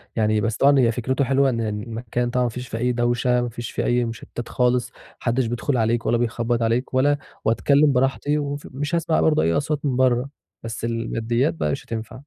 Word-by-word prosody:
يعني 110 -1 +2
بس 115 0 -1
طبعًا 140 0 +5
هي 120 -2 +4
فكرته 130 +4 -1
حلوة 135 +1 +3
إن 115 -2 -1
المكان 115 +3 -3
طبعًا 125 0 +1
ما 120 - +1
فيش 125 +2 -7
فيه 115 - -5
أي 125 +2 +1
دوشة، 120 +1 +1
ما 120 - -2
فيش 120 0 -7
فيه - - -2
أي 120 0 +2
مُشتتات 115 +1 -7
خالص، 125 0 +1
ما - - -24 0.2
حدش 125 +1 0
بيدخل 120 +3 -1
عليك 115 +1 +1
ولا 120 - +2
بيخبط 120 0 -1
عليك 115 +3 0
ولا 145 +3 +3 0.3
وأتكلّم 140 +5 +3
براحتي 135 +3 +1
وف 145 0 -4
مش 145 +5 -2
هاسمع 165 -1 +1
برضو 155 -1 +3
أي 85 - +2
أصوات 150 0 -1
من 130 -3 0
برّه، 130 +1 +2 0.3
بس 115 0 -6
الماديات 115 -2 -1
بقى 75 -2 -1
مش - - -4
هتنفع. 110 -1 -5
120 Hz, 210 wpm, -23 LUFS, 115-135 Hz, 0.3 s, طبعًا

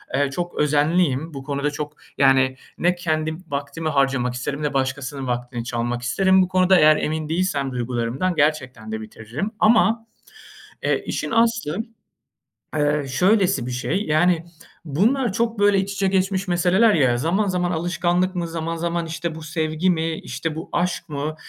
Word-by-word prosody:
eee, 140 0 +1
çok 175 +4 -4
özenliyim. 150 0 +2
Bu 135 -1 -7
konuda 140 +1 -2
çok, 150 0 -5 0.2
yani 130 -1 +4 0.2
ne 175 +1 +2
kendim 160 0 -2
vaktimi 145 +2 -3
harcamak 135 -3 +1
isterim 140 +4 -4
ne 145 -1 -1
başkasının 135 0 -2
vaktini 120 -1 -3
çalmak 120 0 -2
isterim 190 +10 +3
bu 185 - +2
konuda. 185 0 +4
Eğer 155 0 +6
emin 155 0 -2
değilsem 160 -6 0
duygularımdan 125 +7 -2
gerçekten 130 -7 0
de 110 0 -4
bitiririm. 115 - -5
Ama, 225 +1 +4 0.8
eee, - - 0
işin - - -3
aslı, 225 -7 +1 1.0
ııı, 145 -1 +1
şöylesi 180 - +2
bir 125 - -4
şey. 155 +11 -1
Yani, 165 +2 +2 0.4
bunlar 215 - +1
çok 230 -1 -1
böyle 205 -1 +4
iç 195 +1 -2
içe 195 0 0
geçmiş 190 0 0
meseleler 185 +5 +3
ya. 130 -6 +3
Zaman 180 +10 +1
zaman 180 -1 0
alışkanlık 175 +2 0
mı, 175 -1 -2
zaman 165 0 -3
zaman 170 0 -2
işte 165 0 -4
bu 160 - -8
sevgi 155 +2 -1
mi, 165 -1 0
işte, 150 +5 -4
bu 165 +5 -7
aşk 175 -1 -1
mı 150 +1 -3
160 Hz, 160 wpm, -22 LUFS, 140-180 Hz, 1.0 s, Eğer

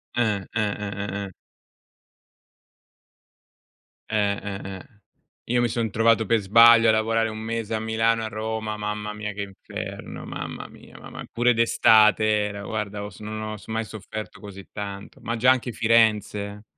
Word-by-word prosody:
Eh, 110 -4 +1
eh, 115 - +1
eh, 105 -1 -2
eh, 100 0 -4
eh. - - -11 2.8
Eh, 105 -2 +2
eh, 100 -1 -5
eh. 95 +3 -10 0.5
Io 120 +1 +1
mi 120 - +3
son 115 -1 -1
trovato 115 +1 +3
per 115 +2 +3
sbaglio, 115 +3 +7
a - - +7
lavorare 110 +1 +1
1 110 0 -6
mese 115 0 -3
a 110 - 0
Milano 115 +1 +1
e - - -3
a - - -2
Roma, 110 0 -4
mamma 105 0 -4
mia, 105 -1 -5
che 100 - -5
inferno! 100 -1 -7
Mamma - - -6
mia, - - -16
mam - - -9
Pure 120 +1 +3
d'estate 110 -2 +5
era 105 -1 0
guarda 105 -1 -4
ho 105 - -6
s - - -15
non 110 0 -6
ho 110 0 -4
mai 110 0 -2
sofferto 110 0 -8
così 100 -2 -10
tanto. 100 -1 -7
Ma 115 - -2
già 125 +3 +5
anche 125 -1 0
Firenze. 105 -3 +1
110 Hz, 165 wpm, -24 LUFS, 105-115 Hz, 2.8 s, sbaglio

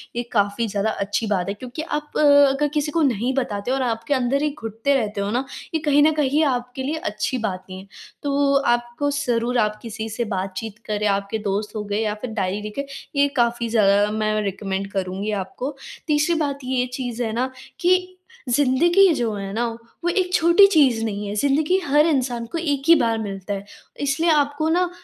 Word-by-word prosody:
ये 240 - -1
काफ़ी 205 +1 +1
ज़्यादा 205 +1 -1
अच्छी 205 +2 -2
बात 195 -3 0
है - - -1
क्योंकि 250 +6 -6
आप, 300 -2 -4
अगर 285 -1 +5
किसी 300 0 0
को 330 - +1
नहीं 255 -2 +1
बताते 245 -3 -2
हो - - +2
और 270 - -1
आपके 230 +3 -1
अंदर 260 +1 +1
ही 300 - +1
घुटते 225 +5 -1
रहते 210 -5 -1
हो 200 - -1
ना, 250 +3 0 0.3
ये 320 - +1
कहीं 290 0 +4
न 315 - +5
कहीं 300 +1 +2
आपके 250 0 -2
लिए 300 +4 -2
अच्छी 210 +5 -2
बात 190 -5 -3
नहीं 185 - -7
है। 195 - -13 0.4
तो 280 0 +2 0.2
आपको 240 +4 -3
ज़रूर 245 -3 0
आप 210 0 +1
किसी 220 -1 -5
से 230 +2 -2
बातचीत 195 +3 -4
करें, 210 0 -1
आपके 200 +2 0
दोस्त 210 +3 -2
हो 210 - -2
गए 205 +1 -2
या 215 -2 0
फिर 250 - -4
डायरी 200 -1 -2
लिखें, 210 +7 -4 0.3
ये 285 0 +4
काफ़ी 235 -1 +1
ज़्यादा 205 -2 +4
मैं 215 0 0
रिकमेंड 195 -1 -3
करुँगी 195 +2 -3
आपको। 270 +8 -6 0.3
तीसरी 300 +3 +2
बात 280 -2 -1
ये 255 0 0
चीज़ 245 -2 -3
है 220 - -2
ना 255 +3 -1 0.3
कि 365 +1 +2 0.4
ज़िंदगी 290 +9 +4
जो 235 -6 -1
है 195 -1 -5
ना, 235 +3 0 0.4
वो 345 - +1
एक 365 0 0
छोटी 340 +4 +6
चीज़ 265 - +4
नहीं 205 -1 -3
है, 200 - -4
ज़िंदगी 290 - +2
हर 295 +2 +4
इंसान 250 -6 0
को 335 - -2
एक 290 -4 -1
ही 335 - +9
बार 230 -5 +1
मिलता 200 -1 -4
है। 200 0 -5 0.3
इसलिए 285 +4 +1
आपको 290 0 +2
ना 355 +2 +2
245 Hz, 200 wpm, -22 LUFS, 210-285 Hz, 0.4 s, ही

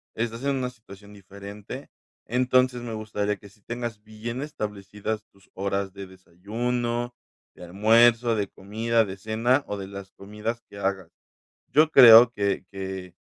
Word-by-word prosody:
Estás 115 +2 -3
en 140 -1 +1
una 125 -1 -2
situación 105 -3 -15
diferente, 100 +6 -10 0.4
entonces, 125 0 +2
me 115 -2 -6
gustaría 105 -1 -2
que 100 - -15
sí 105 +1 -25
tengas 120 -2 -6
bien 115 +4 -6
establecidas 105 -5 -5
tus 100 -1 -25
horas 100 0 -2
de 100 -1 -8
desayuno, 120 +7 -3 0.4
de - - -12
almuerzo, 115 +5 +4
de 100 -2 -1
comida, 110 +3 0
de 95 0 -7
cena 115 +7 +1
o 105 - -4
de 95 -1 -6
las 100 0 -9
comidas 105 +4 -5
que 100 - -12
hagas. 95 -1 -2 0.6
Yo 155 +2 +4
creo 120 -2 +10
que 100 -3 -1
que 95 -2 -6
105 Hz, 150 wpm, -25 LUFS, 100-120 Hz, 0.6 s, creo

